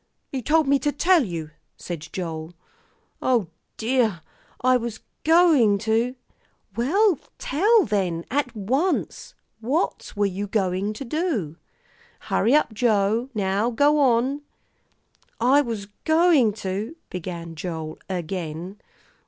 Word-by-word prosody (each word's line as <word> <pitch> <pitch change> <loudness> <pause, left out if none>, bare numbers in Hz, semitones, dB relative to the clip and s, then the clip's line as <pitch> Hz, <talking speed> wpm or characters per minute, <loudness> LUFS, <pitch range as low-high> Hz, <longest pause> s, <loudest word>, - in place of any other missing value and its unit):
"You 265 - -3
told 310 +3 +2
me 280 0 +4
to 295 - 0
tell 340 +2 +3
you," 165 -7 -5 0.3
said 165 -3 -7
Joel. 165 -2 -5 0.7
"O 235 -9 +1 0.3
dear! 225 -6 +1 0.4
I 255 +1 +3
was 235 -3 -3 0.2
going 315 - +5
to 225 +4 0 0.3
" 195 - -38
"Well, 340 - +2 0.2
tell 410 - +3
then, 185 -5 -1
at 265 -3 -1
once; 265 - -1 0.2
what 265 +10 -1
were 205 0 +2
you 200 +1 -3
going 195 0 0
to 270 +6 -7
do? 235 - -2 0.7
Hurry 245 +6 +3
up, 300 -7 +2
Joe; 220 +1 +1
now 200 +2 +1
go 290 +5 +3
on." 265 +2 +2 1.0
"I 260 +5 +5
was 225 -7 -4 0.2
going 315 - +4
to 205 +7 -4
" - - -48
began 170 -2 -6
Joel 160 -1 -6
again. 175 +1 -5
225 Hz, 125 wpm, -24 LUFS, 190-280 Hz, 1.0 s, going